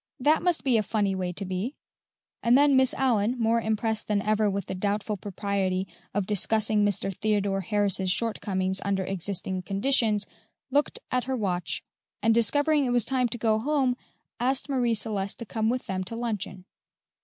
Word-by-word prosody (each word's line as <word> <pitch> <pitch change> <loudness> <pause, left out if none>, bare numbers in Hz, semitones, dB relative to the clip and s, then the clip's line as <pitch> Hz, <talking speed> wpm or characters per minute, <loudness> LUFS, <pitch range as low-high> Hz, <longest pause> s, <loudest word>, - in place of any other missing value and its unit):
"That 295 +5 +3
must 350 -2 +1
be 255 -4 +3
a - - +3
funny 205 -2 0
way 185 -1 -2
to 195 +3 -4
be;" 190 +9 -3 0.7
and 235 +2 +5
then 285 -1 +5
Miss 260 -1 +4
Allyn, 240 -2 +1
more 230 0 +2
impressed 220 0 -1
than 210 -1 +1
ever 215 0 +2
with 200 -1 -2
the - - -5
doubtful 205 +2 -1
propriety 195 -1 -2 0.2
of 205 -1 -1
discussing 215 +1 +2
Mr. 195 -1 -1
Theodore 205 -2 0
Harris's 195 -1 +1
shortcomings 190 -3 0
under 195 -1 0
existing 190 0 -3
conditions, 210 +2 +2 0.5
looked 290 +2 +1
at 250 -1 0
her 260 0 -1
watch, 180 -6 -2 0.4
and 225 +2 +3
discovering 290 +6 +3
it - - -1
was 245 -2 +3
time 255 -2 +1
to 240 - -5
go 220 -1 +2
home, 265 0 +1 0.4
asked 260 +3 +1
Marie 245 -4 +1
Celeste 205 -2 -2
to 235 - -7
come 220 +1 -1
with 250 +1 -2
them 185 -1 -2
to 230 - -5
luncheon. 205 -5 -4
215 Hz, 175 wpm, -27 LUFS, 195-245 Hz, 0.7 s, and